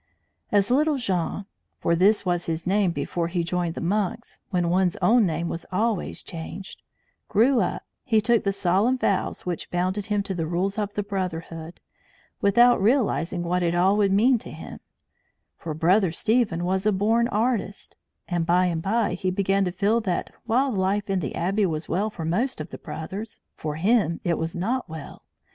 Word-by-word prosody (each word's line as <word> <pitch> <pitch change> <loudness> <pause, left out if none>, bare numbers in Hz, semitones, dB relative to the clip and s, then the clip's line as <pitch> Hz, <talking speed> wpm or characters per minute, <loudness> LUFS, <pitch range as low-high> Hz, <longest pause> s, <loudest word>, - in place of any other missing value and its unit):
As 205 +1 +2
little 300 +3 +3
Jean 195 -4 -2 0.3
(for 170 - +1
this 200 +4 +3
was 175 -1 0
his 165 0 -2
name 195 0 +2
before 170 0 -2
he 170 0 -1
joined 175 -1 -2
the - - -5
monks, 205 +5 -2
when 175 -3 0
one's 180 -1 +2
own 230 -3 +4
name 170 +1 -2
was 165 - -5
always 210 +1 -1
changed) 185 +3 -8 0.5
grew 240 +5 +4
up, - - -1 0.2
he 225 -4 +3
took 230 +1 +2
the 200 - +1
solemn 195 +7 +2
vows 200 -6 -1
which 175 -2 -4
bound 180 +2 -1
him 205 0 -1
to 195 - -4
the 165 -3 -2
rules 190 +5 -1
of 205 -1 -2
the 205 - -1
brotherhood 170 -4 -5 0.6
without 240 +3 +5
realizing 200 - +1
what 180 +1 0
it 170 0 +1
all 185 +3 +4
would 205 -2 +2
mean 235 +5 +4
to - - -10
him; - - -9 0.8
for 155 -2 -6
Brother 180 +3 +3
Stephen 205 -2 +1
was 190 +3 0
a - - +4
born 220 +4 +2
artist; 220 -3 -2 0.3
and, 175 -2 0
by 180 +2 +3
and 170 -2 -1
by, 210 +2 +1
he 185 +1 -1
began 195 +1 +1
to 180 - -1
feel 205 +6 +1
that 185 -5 -2
while 260 +4 +2
life 195 0 0
in 190 - +1
the 140 -7 -4
Abbey 195 +4 +1
was 155 -1 -3
well 205 +4 0
for 170 -6 -6
most 220 +10 0
of 155 - -6
the - - -8
brothers, 200 +7 -7 0.2
for 150 -1 -4
him 185 -1 +2
it 170 -2 0
was 160 0 -3
not 225 +5 -2
well. 160 -3 -9
190 Hz, 185 wpm, -25 LUFS, 175-215 Hz, 0.8 s, without